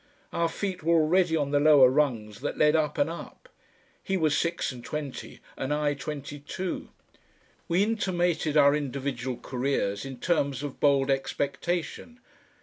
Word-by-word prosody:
Our 170 0 +1
feet 185 0 -4
were 170 +1 +2
already 165 +2 +3
on 145 -3 0
the 145 - +3
lower 145 -3 +7
rungs 125 -7 0
that - - -3
led 150 +1 +4
up 150 -2 0
and 145 - +2
up. 170 +1 -9 0.5
He 195 - -1
was 155 -4 +2
six 170 -3 -1
and 125 -2 -10
twenty, 150 -2 -6
and 135 - -3
I 150 0 +1
twenty 145 0 -6
two. 185 +6 -5 0.8
We 175 +3 +3
intimated 175 -7 0
our 140 -1 +6
individual 135 -3 -3
careers 125 -6 -2
in 135 -2 -7
terms 140 -4 0
of 145 -2 -6
bold 140 -1 +3
expectation. 160 - -2
145 Hz, 150 wpm, -27 LUFS, 135-170 Hz, 0.8 s, lower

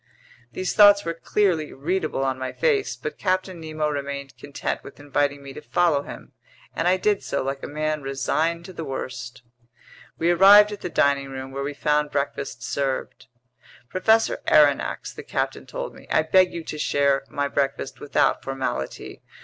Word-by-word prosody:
These 185 +6 -3
thoughts 205 -1 +7
were 165 - -1
clearly 165 -2 0
readable 155 -1 -2
on 130 -1 -1
my 130 0 -3
face; 430 -4 +1
but - - -7
Captain 185 -2 -1
Nemo 155 -1 -2
remained 140 -1 -4
content 140 - -4
with 140 - -12
inviting 145 0 -1
me 135 -1 -9
to - - -9
follow 150 +3 +2
him, - - -10 0.4
and 165 - 0
I 185 +1 +4
did 205 +1 +1
so - - -2
like 135 +1 -3
a - - -5
man 155 +1 -2
resigned 160 +5 -1
to 185 - -10
the 165 - -6
worst. 130 -3 -6 0.7
We 170 +1 +2
arrived 200 +4 +8
at 205 - -7
the 180 - -4
dining 140 -3 +2
room, 135 0 -7
where 135 +1 -4
we 145 +1 -4
found 150 +1 +1
breakfast 140 -4 -3
served. 135 -3 -3 0.6
"Professor 220 +4 +2
Aronnax," 145 -2 +3
the - - -8
captain - - -3
told - - -5
me, - - -15
"I 155 - +3
beg 185 +3 +4
you 170 - -6
to 155 - -6
share 140 -2 +2
my 145 0 -1
breakfast 140 -1 -2
without 145 -2 +1
formality. 130 - -4
150 Hz, 175 wpm, -24 LUFS, 140-175 Hz, 0.7 s, arrived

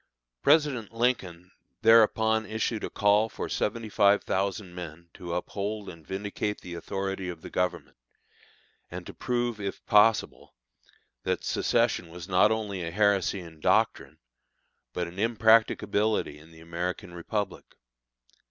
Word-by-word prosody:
President 140 -8 +3
Lincoln 95 -7 -1 0.3
thereupon 110 0 +5
issued 110 0 -2
a - - -3
call 105 +2 +3
for - - -5
seventy 115 +1 -2
five 100 -1 +3
thousand 95 -1 -2
men 85 -1 -9
to 85 -2 -6
uphold 100 +3 -4
and 80 -3 -13
vindicate 105 +1 -3
the 90 - -8
authority 95 +2 -4
of 85 -2 -8
the - - -9
Government, 90 -1 -2 0.9
and - - -7
to - - -9
prove, 120 -3 -2
if 100 -1 -5
possible, 105 +1 +3 0.7
that - - -2
secession 85 - +1
was 85 +1 -9
not 95 +2 +4
only 105 -4 -2
a 85 - -3
heresy 100 0 +2
in 80 -2 -12
doctrine, - - +1 0.7
but 90 - -2
an 90 +3 -10
impracticability 110 -5 +2
in 80 +2 -17
the 80 0 -15
American 85 +2 -4
Republic. 95 +3 -4
100 Hz, 135 wpm, -28 LUFS, 90-110 Hz, 0.9 s, thereupon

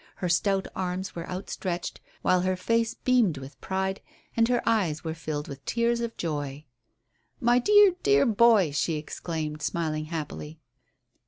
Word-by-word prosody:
Her 180 - -3
stout 195 +2 +2
arms 185 +1 -3
were 170 0 -6
outstretched, 180 -1 -4 0.2
while 180 -1 +3
her 185 +1 +1
face 230 +5 0
beamed 235 - +2
with 135 +1 -10
pride, 190 0 -2 0.3
and 230 0 +4
her 245 -1 0
eyes 185 -9 +1
were 160 -1 -3
filled 155 -2 -4
with 135 -1 -9
tears 235 - +1
of 235 -1 -4
joy. 145 -3 -4 0.7
"My 240 -2 +4
dear, 415 +6 +6
dear 140 +1 +4
boy," 220 -6 +5
she 150 +3 0
exclaimed, 155 0 -4
smiling 155 -1 -1
happily. 155 -1 -6
180 Hz, 150 wpm, -27 LUFS, 155-230 Hz, 0.7 s, dear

